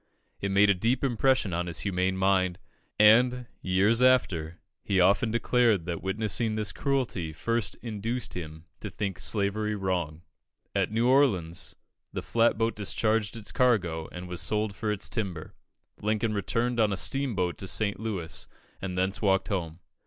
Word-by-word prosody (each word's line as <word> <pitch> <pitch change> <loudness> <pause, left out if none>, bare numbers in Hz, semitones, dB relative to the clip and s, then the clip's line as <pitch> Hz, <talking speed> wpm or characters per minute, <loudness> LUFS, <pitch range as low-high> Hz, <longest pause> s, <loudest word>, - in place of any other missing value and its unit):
It 100 - -2
made 100 +1 +5
a - - +5
deep 115 +9 0
impression 130 -5 +2
on 85 +1 -1
his 85 -2 -3
humane 95 -1 0
mind, 95 -2 +2 0.4
and, 125 +4 +5 0.2
years 100 +6 +2
after, 90 -11 +2 0.3
he 95 -2 +1
often 100 +5 +4
declared 115 -4 +2
that 85 -2 -4
witnessing 110 +3 -1
this 105 -3 0
cruelty 125 - -2
first 115 +7 -2
induced 115 +2 -3
him 80 -2 -7
to - - -6
think 100 -4 -4
slavery 105 +1 0
wrong. 90 -5 -2 0.5
At - - +1
New 115 +2 +1
Orleans 105 - +1 0.4
the - - -4
flat 115 -1 +2
boat 115 +1 0
discharged 105 +3 0
its 110 - -3
cargo, 90 -11 +1
and 90 0 -7
was 90 -1 -3
sold 105 +2 0
for 105 +2 -2
its 105 -1 0
timber. 95 -9 -4 0.5
Lincoln 110 +1 0
returned 115 +5 -1
on 110 -2 +3
a 100 - -1
steamboat 105 -9 0
to 95 - -6
St. 100 +2 0
Louis, 95 -7 -3 0.3
and 90 -1 -4
thence 95 +2 0
walked 95 -3 +2
home. 85 -3 -3
100 Hz, 160 wpm, -28 LUFS, 90-115 Hz, 0.5 s, made